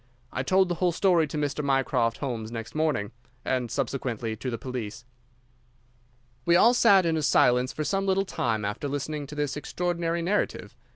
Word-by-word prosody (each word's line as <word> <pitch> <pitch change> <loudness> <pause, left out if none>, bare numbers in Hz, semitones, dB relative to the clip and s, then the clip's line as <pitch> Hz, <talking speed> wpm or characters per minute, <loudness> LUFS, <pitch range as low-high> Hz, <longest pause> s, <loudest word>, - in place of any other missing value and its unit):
I - - -1
told 190 +7 +3
the 175 - -1
whole 180 -1 +3
story 170 -2 +3
to 150 - -5
Mr. 145 0 -1
Mycroft 135 -4 +1
Holmes 115 -5 -4
next 115 -1 -6
morning, 155 -9 0 0.3
and 125 -2 -1
subsequently 120 -3 -2
to 130 +4 -5
the 115 - -3
police." 120 -3 -6 1.4
We 170 +3 +4
all 230 +7 +6
sat 200 -7 +5
in 160 -1 +1
silence 125 -3 +3
for 155 - -3
some 195 +6 -1
little 195 +1 +2
time 110 - -1
after 105 +8 -3
listening 145 +1 -4
to 150 - -9
this 145 -2 -2
extraordinary 170 +2 -2
narrative. 200 +4 -1
145 Hz, 170 wpm, -27 LUFS, 125-170 Hz, 1.4 s, all